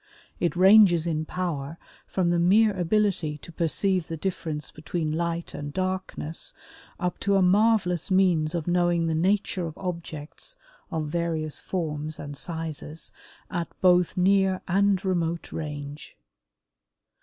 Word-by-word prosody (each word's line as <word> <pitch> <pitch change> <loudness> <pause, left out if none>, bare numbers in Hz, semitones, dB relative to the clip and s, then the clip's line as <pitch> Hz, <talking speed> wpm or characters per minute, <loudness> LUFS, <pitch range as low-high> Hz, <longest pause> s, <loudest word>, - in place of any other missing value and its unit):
It 175 - 0
ranges 185 -3 +6
in 160 -2 -1
power 160 -4 -3 0.3
from 180 -2 +1
the 175 - +2
mere 205 +5 +5
ability 180 -4 +1
to 160 - -12
perceive 175 +2 0
the 165 - -4
difference 155 -3 -4
between 155 0 -3
light 170 0 -2
and 145 0 -5
darkness 185 -3 -3 0.4
up 180 -1 -2
to 200 0 +1
a 195 - +4
marvelous 190 -3 +3
means 180 -4 +3
of 165 -3 -2
knowing 175 -1 +2
the 165 - 0
nature 185 +1 +1
of 160 - -9
objects 170 - -6 0.3
of 160 -2 -2
various 160 -1 -2
forms 155 -3 -3
and 145 -1 -7
sizes, 160 -1 -5 0.4
at 175 -3 -2
both 180 -2 +4
near 190 0 +3
and 195 +1 +2
remote 170 -3 -1
range. 145 -2 -6
170 Hz, 130 wpm, -26 LUFS, 160-185 Hz, 0.4 s, ranges